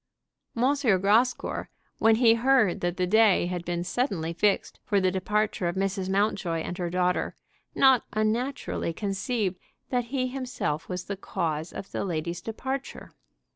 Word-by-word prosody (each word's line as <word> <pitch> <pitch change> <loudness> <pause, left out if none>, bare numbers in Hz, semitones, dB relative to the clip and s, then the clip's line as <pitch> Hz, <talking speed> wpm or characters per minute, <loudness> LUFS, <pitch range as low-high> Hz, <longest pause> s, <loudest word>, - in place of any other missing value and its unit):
M. 255 +4 +3 0.3
Grascour, 225 +6 +1 0.3
when 225 0 +5
he 230 -1 +5
heard 235 -4 +3
that 175 0 -1
the 180 - +1
day 210 -1 +4
had 175 -1 -3
been 175 0 -2
suddenly 180 - -1
fixed 200 +4 0
for 205 - +1
the 185 -1 +2
departure 200 0 0
of 170 - -2
Mrs. 190 0 -1
Mountjoy 195 -4 0
and 175 - -4
her 175 -1 -1
daughter, 180 0 0 0.4
not 265 -3 +5
unnaturally 215 -2 -1
conceived 200 0 -2 0.3
that 245 -2 0
he 255 +1 -1
himself 250 - -3
was 180 -1 -3
the 200 - -4
cause 160 -4 -3
of 195 - -8
the - - -2
ladies' 170 -1 -3
departure. 265 +4 -5
200 Hz, 150 wpm, -27 LUFS, 180-235 Hz, 0.4 s, when